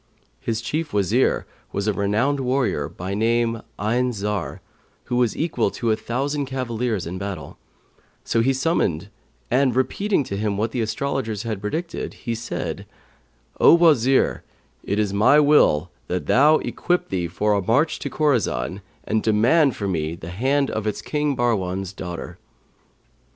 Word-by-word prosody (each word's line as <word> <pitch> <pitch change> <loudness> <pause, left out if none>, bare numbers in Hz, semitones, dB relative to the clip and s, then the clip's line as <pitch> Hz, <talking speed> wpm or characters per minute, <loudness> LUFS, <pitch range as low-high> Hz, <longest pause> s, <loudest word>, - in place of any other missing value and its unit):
His 115 - -2
chief 150 +6 -3
Wazir 105 +5 +2 0.3
was 100 - -2
a 105 - +2
renowned 110 +9 +1
warrior, 125 - 0
by 90 +3 -6
name 115 +2 +1 0.2
Ayn 120 +4 +1
Zαr, 105 -1 -3 0.4
who 125 - -3
was 120 -3 +1
equal 160 +1 0
to 115 -2 -1
a - - +3
thousand 140 +5 -2
cavaliers 120 -6 -2
in 90 +3 -5
battle; 95 -7 -6 0.6
so 115 - 0
him 115 - +2
he 135 - +3
summoned 115 - 0 0.4
and, 130 -1 +3
repeating 145 - +1
to 100 - -5
him 105 -1 -1
what 110 +2 -1
the 120 - -1
astrologers 110 -1 -2
had 110 -4 -4
predicted, 160 +11 -4
he 115 - -4
said, 115 +1 -5 0.7
'O - - +8
Wazir, 140 -7 +3 0.4
it 100 - -2
is 105 -2 0
my 125 +9 +5
will 95 - +4 0.2
that 90 0 -2
thou 150 +4 +5
equip 180 0 -1
thee 90 -2 -1
for 105 +5 0
a 100 - +1
march 140 - +1
to - - -4
Khorasan 100 - 0 0.2
and 110 0 0
demand 120 +7 +3
for 100 - -3
me 80 -3 -2
the 85 0 -8
hand 135 +8 +1
of 110 -1 -3
its 105 - -3
King 150 -2 -1
Bahrwan's 95 -5 -1
daughter.' 90 -2 -7
115 Hz, 155 wpm, -23 LUFS, 100-135 Hz, 0.7 s, O